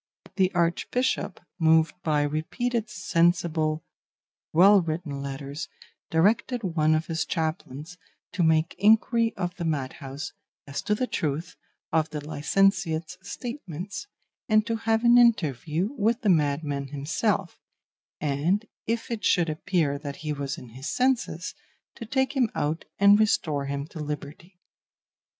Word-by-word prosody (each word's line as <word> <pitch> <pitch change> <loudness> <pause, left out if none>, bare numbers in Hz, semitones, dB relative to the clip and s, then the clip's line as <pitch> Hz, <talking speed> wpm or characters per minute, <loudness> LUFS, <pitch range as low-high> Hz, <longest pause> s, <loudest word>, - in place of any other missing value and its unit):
The 190 -1 +3
Archbishop, 175 +7 0 0.2
moved 160 0 +4
by 150 -3 +1
repeated 220 - -2
sensible, 165 -5 +1 0.7
well 195 +4 +7
written 155 -4 -4
letters, 140 +2 -5 0.4
directed 220 +8 +2
one 155 -4 +2
of 155 +1 -1
his 165 -1 -1
chaplains 160 0 -4 0.3
to 185 - -2
make 160 0 +3
inquiry 225 +2 +4
of 180 -2 -2
the 175 - -4
madhouse 140 -2 -4 0.3
as 140 0 -4
to 210 - 0
the 255 - 0
truth 155 - -3 0.4
of 160 -1 +2
the 150 - -4
licentiate's 170 +1 +1
statements, 200 - -6 0.4
and 215 -1 +4
to 230 - -1
have 225 0 +1
an 240 0 +7
interview 170 - +2
with 225 +2 +1
the 215 - +1
madman 145 -3 +1
himself, 165 - -1 0.6
and, 155 +9 0 0.2
if 230 +1 -2
it 225 -2 -3
should 170 -4 +3
appear 155 -3 0
that 140 -1 -6
he 150 - 0
was 140 -1 -4
in 125 - -11
his 130 +6 -7
senses, 255 -1 0 0.4
to 230 - -9
take 265 +3 0
him 250 -4 +3
out 155 +3 -1
and 200 +1 +6
restore 155 -9 +1
him 140 0 -3
to 165 - -9
liberty. 150 +4 -7
165 Hz, 135 wpm, -26 LUFS, 150-210 Hz, 0.7 s, well